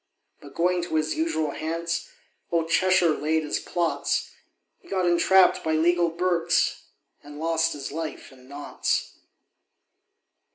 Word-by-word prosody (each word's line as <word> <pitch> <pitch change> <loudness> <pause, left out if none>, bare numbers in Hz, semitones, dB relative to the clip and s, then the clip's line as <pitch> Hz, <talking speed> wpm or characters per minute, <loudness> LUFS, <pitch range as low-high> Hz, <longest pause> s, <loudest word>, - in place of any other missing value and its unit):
But 140 -1 -13
going 180 +1 +1
to 170 -2 -4
his 155 0 +1
usual 160 -2 -1
Hants, 165 +3 -3 0.4
Old 165 -1 0
Cheshire 180 -3 +3
laid 155 +2 0
his 150 - -2
plots: 170 -2 -1 0.5
He 350 - -22
got 185 -1 0
entrapp'd 180 +2 +4
by 160 - -1
legal 170 +2 +3
Berks, 170 0 0 0.4
And 145 0 -12
lost 165 0 +1
his 140 -2 -6
life 160 -1 -6
in 130 -1 -18
Notts. 140 - -2
165 Hz, 130 wpm, -25 LUFS, 155-175 Hz, 0.5 s, entrapp'd